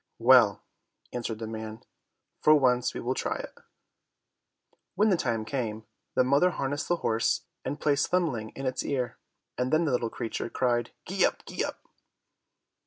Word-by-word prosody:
"Well," 120 -4 +6 0.5
answered 120 -2 -3
the 110 - -5
man, 110 0 -6 0.6
"for 155 - +7
once 125 -4 +2
we - - -3
will 125 +2 -1
try - - -2
it." - - -7 1.4
When 210 +3 +4
the 190 - +4
time 115 -8 -1
came, 110 -4 -3 0.3
the - - +5
mother 140 +8 +4
harnessed 145 -3 -2
the 175 - +2
horse, 115 0 +2 0.2
and 145 - -4
placed 145 -1 +2
Thumbling 145 -12 0
in 135 - -5
its 130 - -1
ear, 130 -4 -2 0.4
and 125 +1 0
then 160 +2 +3
the 150 - +1
little 120 -2 0
creature 115 +1 -4
cried, 120 -2 0 0.2
"Gee - - +1
up, - - +1
gee - - -2
up!" - - -5
125 Hz, 165 wpm, -28 LUFS, 115-145 Hz, 1.4 s, for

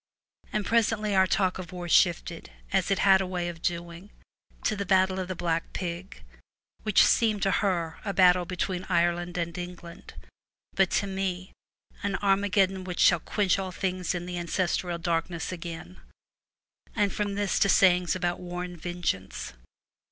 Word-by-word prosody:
And 210 -1 -1
presently 220 -2 +1
our 190 -1 +4
talk 185 -1 +1
of 180 -2 -7
war 180 -1 -6
shifted, - - +2 0.2
as - - +2
it 195 - +2
had 195 -1 +6
a 190 - -2
way 180 -1 -2
of 165 -1 -9
doing, 170 +2 -4 0.5
to 215 - +1
the 200 - -2
battle 190 0 +2
of 185 - -3
the 185 - -4
Black 165 -1 -2
Pig, 180 +1 -6 0.6
which 215 -3 +4
seems 215 -3 +2
to 195 - +2
her 175 -6 0
a 200 - -2
battle 180 -2 +5
between 180 +1 -3
Ireland 175 0 +1
and 170 -1 -2
England, 175 -1 -9 0.6
but 190 -2 +3
to - - +1
me 190 -1 -3 0.5
an 200 -1 -1
Armageddon 195 -1 +2
which 180 -1 -6
shall 175 - +5
quench 195 +2 0
all 190 -1 -4
things 185 -1 -2
in 175 0 -4
the 180 0 -4
Ancestral 175 0 -1
Darkness 170 0 -2
again, 165 - -8 1.0
and 205 -1 +1
from 205 -1 -2
this 205 -1 0
to 200 - +3
sayings 180 -2 +4
about 175 -2 -1
war 180 0 -5
and 175 -2 -8
vengeance. 95 - -3
180 Hz, 165 wpm, -27 LUFS, 175-195 Hz, 1.0 s, had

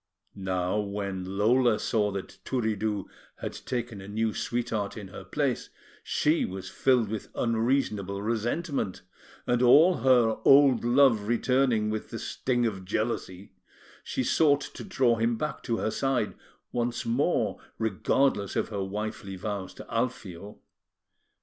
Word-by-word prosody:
Now, 95 0 -1
when 100 -2 -4
Lola 120 +2 +4
saw 105 -2 +1
that 100 -1 -7
Turiddu 110 -5 -1 0.3
had - - -5
taken 120 -5 -4
a 95 - -10
new 110 +1 -1
sweetheart 115 -3 -2
in 100 -3 -8
her - - -9
place, - - -1 0.3
she 155 +3 +1
was 95 0 -5
filled 125 -4 +2
with 105 0 -5
unreasonable 115 -4 0
resentment; 115 - -2 0.4
and 120 0 +1
all 155 +8 +6
her 120 -3 +4
old 135 -3 +6
love 120 -4 +4
returning 120 -2 +2
with 110 0 -4
the - - -5
sting 120 -2 -1
of 100 -4 -2
jealousy, 100 -2 -3 0.5
she 130 - -2
sought 145 +2 +3
to - - -8
draw 120 -3 +2
him 115 +1 +1
back 150 +4 -3
to 115 -2 -1
her 110 - -1
side 135 +1 0 0.4
once 120 0 -2
more, 115 - 0 0.2
regardless 110 0 +1
of - - 0
her 100 -3 -2
wifely 105 0 -5
vows 95 -1 -4
to - - -10
Alfio. 105 -5 -4
110 Hz, 135 wpm, -28 LUFS, 100-125 Hz, 0.5 s, all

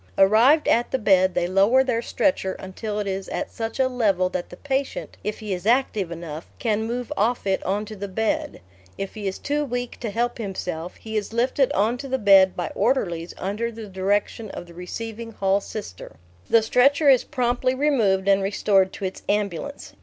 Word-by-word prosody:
Arrived 230 +10 +5
at 240 +1 +3
the - - 0
bed, 190 -4 +3
they - - +1
lower 200 +8 +4
their 245 -3 0
stretcher 235 -7 0
until 205 +3 -6
it 210 - -1
is 195 0 -4
at 295 - -4
such 225 0 -5
a 260 - +4
level 205 -8 +1
that 180 -1 -4
the - - -11
patient, 275 -1 -3
if 210 0 -3
he 210 -2 -3
is 180 +3 -4
active 230 -7 +2
enough, 165 -1 -7
can 220 -1 0
move 245 +4 -3
off 235 0 0
it 195 -1 +1
on 205 +3 -1
to 215 0 -8
the 200 0 -5
bed; 225 +10 -2 0.4
if 195 - -5
he 210 -2 -5
is 190 - -3
too 295 +1 -1
weak 245 -3 -4
to 235 - -3
help 235 +3 -1
himself 180 -5 -4
he 220 0 -8
is 210 +1 -3
lifted 250 +3 +2
on 225 +5 +1
to 275 - -6
the 265 0 0
bed 195 -4 +6
by 175 - -3
orderlies 175 -10 0
under 210 +5 -2
the 225 -1 -8
direction 200 +3 -1
of - - -7
the 170 - -14
receiving 225 +6 -7
hall 195 0 +1
Sister. 200 - -8 0.4
The 230 -1 +5
stretcher 275 +6 +3
is 265 -3 +6
promptly 255 -1 0
removed 225 -10 +2
and 195 0 +4
restored 195 -1 +2
to 195 - -5
its 190 - -5
ambulance. 210 - -2
215 Hz, 200 wpm, -24 LUFS, 190-245 Hz, 0.4 s, bed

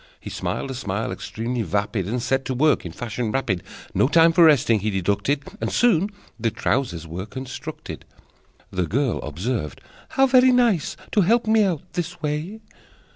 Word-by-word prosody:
He - - -8
smiled 135 - -3
a - - -3
smile 110 0 -3
extremely 115 +2 -3
vapid, 100 0 -1
And 120 +3 -2
set 135 +1 +1
to 130 - -2
work 140 - +2
in - - -8
fashion 115 +3 -3
rapid; 115 -9 -1 0.3
No - - +3
time 165 +2 +5
for 170 - +6
resting 125 -8 +4
he 105 +2 -1
deducted, 100 +8 0 0.2
And - - -1
soon 205 -5 +3 0.3
the 115 0 +1
trousers 100 -9 -1
were 90 +5 -6
constructed. 130 +2 -7 0.7
The 90 -2 -1
girl 130 - 0
observed: 85 - -3 0.4
"How 270 - +6
very 255 -1 +6
nice 235 - +2
To 210 - +3
help 225 +6 +3
me 220 0 +4
out 180 -7 0
this 175 0 -4
way!" 155 +8 -3
130 Hz, 170 wpm, -23 LUFS, 105-170 Hz, 0.7 s, for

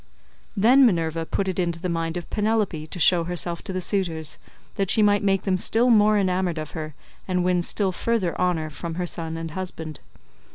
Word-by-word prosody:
Then 250 +7 +6
Minerva 165 -7 +1
put 195 - -2
it 185 -1 -2
into 170 -2 -1
the 180 - -3
mind 165 0 -2
of 175 - -6
Penelope 210 -7 -1
to 180 - -5
show 170 0 +5
herself 175 -1 -2
to - - -4
the 185 0 -3
suitors, 170 -5 -2 0.3
that 195 -2 -2
she 215 0 +3
might 205 0 +3
make 195 -2 +1
them 185 -2 0
still 235 +6 +4
more 215 -1 +5
enamoured 185 -3 0
of 155 -1 -5
her, 155 -3 -6 0.3
and 180 -1 0
win 180 -1 +1
still 190 +2 0
further 195 -2 -1
honour 165 -4 0
from 165 +3 -6
her 180 +1 -2
son 165 -1 -3
and 165 -1 -6
husband. 160 -3 -6
180 Hz, 200 wpm, -24 LUFS, 165-195 Hz, 0.3 s, Then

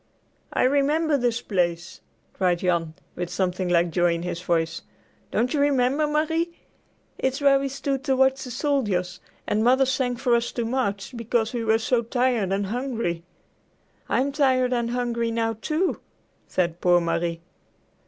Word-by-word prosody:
"I - - +1
remember 290 +4 +2
this 245 -2 0
place;" 175 -3 -2 0.3
cried 180 -2 +1
Jan, 170 -3 -1 0.2
with 175 -1 -4
something 185 -1 -1
like 170 -1 +2
joy 175 0 +2
in 170 - -5
his 175 -1 -4
voice. 165 -2 -1 0.5
"Don't 250 +4 0
you 300 - +1
remember, 280 +1 +2
Marie? 320 +3 0 0.6
It's 265 +2 0
where 280 -1 +5
we 275 - -2
stood 275 0 -3
to 270 -3 +2
watch 265 0 +2
the 255 - -7
soldiers, 210 - -1 0.3
and 215 +1 0
Mother 260 +3 +4
sang 255 -1 0
for 240 0 0
us 235 0 +1
to 235 - -2
march, 225 -2 -2
because 230 0 -1
we 235 -2 -2
were 220 0 +3
so 230 +2 +1
tired 240 -4 0
and 200 +1 0
hungry." 230 -6 -2 0.9
"I'm 275 +2 +1
tired 260 -3 +2
and 235 -1 0
hungry 235 -1 -1
now, 225 0 0
too," 325 +4 0 0.5
said 175 -1 -1
poor 175 -1 +5
Marie. 170 0 -1
235 Hz, 160 wpm, -24 LUFS, 180-265 Hz, 0.9 s, where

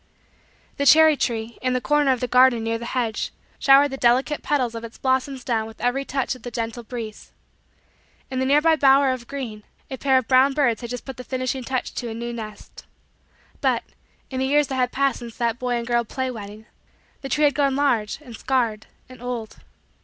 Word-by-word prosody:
The 280 - +1
cherry 315 0 +7
tree, 230 -3 -3
in 255 0 0
the 255 - +1
corner 295 +1 +2
of 255 - -1
the 250 - -1
garden 250 -1 +4
near 225 0 -1
the 235 - -6
hedge, 225 -3 -1 0.3
showered 275 +1 +6
the 270 - -5
delicate 260 +4 +2
petals 255 -5 0
of 230 0 -6
its 230 0 -9
blossoms 260 0 -1
down 225 -3 -1
with 225 - -13
every 260 +3 0
touch 270 -1 -1
of 255 - -12
the 245 - -6
gentle 230 0 -4
breeze. 225 -2 -8 1.0
In 260 - -2
the 260 - +1
nearby 300 +4 +4
bower 275 -1 +5
of 250 -2 -5
green, 245 -7 -6 0.3
a 265 - -5
pair 265 -2 +3
of 255 -3 0
brown 265 +2 +5
birds 260 -6 +1
had 235 - -6
just 245 0 -6
put 265 - -8
the 250 - -7
finishing 255 +1 -3
touch 255 +1 -3
to 240 - -4
a 225 - -6
new 235 +1 -5
nest. 215 -3 -9 0.8
But, - - +1 0.5
in 260 - -3
the 265 - 0
years 290 0 +2
that 265 - -2
had 250 -1 +1
passed 275 0 +1
since 235 -2 -10
that 235 0 -1
boy 250 -1 -1
and 235 -1 -2
girl 240 0 +1
play 260 +3 -3
wedding, 215 -1 -9 0.6
the 270 - -6
tree 300 - +1
had 290 -1 +5
grown 275 -1 +1
large, 240 -7 +1
and 240 -5 -10
scarred, 230 -4 -1 0.2
and 255 -2 -14
old. 245 -3 -5
255 Hz, 215 wpm, -23 LUFS, 235-270 Hz, 1.0 s, cherry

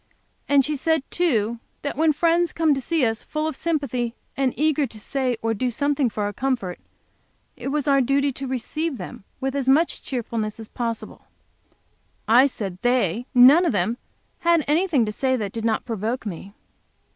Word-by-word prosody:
And 280 -2 +5
she 300 - -1
said, 320 +1 +1
too, 235 -10 +1 0.2
that 285 - -3
when 315 +1 +3
friends 340 +3 +2
came 320 -2 +3
to 270 - -2
see 315 +1 +1
us, 225 -1 -1
full 305 0 -3
of 315 - -2
sympathy 260 -7 -2 0.2
and 270 -2 +1
eager 300 -1 +2
to 220 -2 -10
say 255 +1 -1
or 225 0 +1
do 250 +4 -1
something 280 +2 0
for 210 -1 -3
our 205 0 -2
comfort, 240 -8 -2 0.8
it - - -7
was 290 +1 -1
our 275 -1 +4
duty 275 +2 +2
to 270 +1 -5
receive 265 +4 -3
them 190 0 -9
with 270 +1 -2
as 270 -2 0
much 315 +5 +3
cheerfulness 230 -4 -3
as 220 - -9
possible. 230 -2 -5 1.0
I 245 +5 +6
said 195 -8 -5
they, 245 -2 +1
none 265 +8 +8
of 335 - +1
them, 205 +5 0 0.4
had 335 -3 +3
anything 305 -5 +2
to 210 - -3
say 260 +4 0
that 210 -5 -3
did 225 +1 -4
not 225 -1 0
provoke 225 +1 -3
me. 200 +1 -7
260 Hz, 180 wpm, -23 LUFS, 225-290 Hz, 1.0 s, none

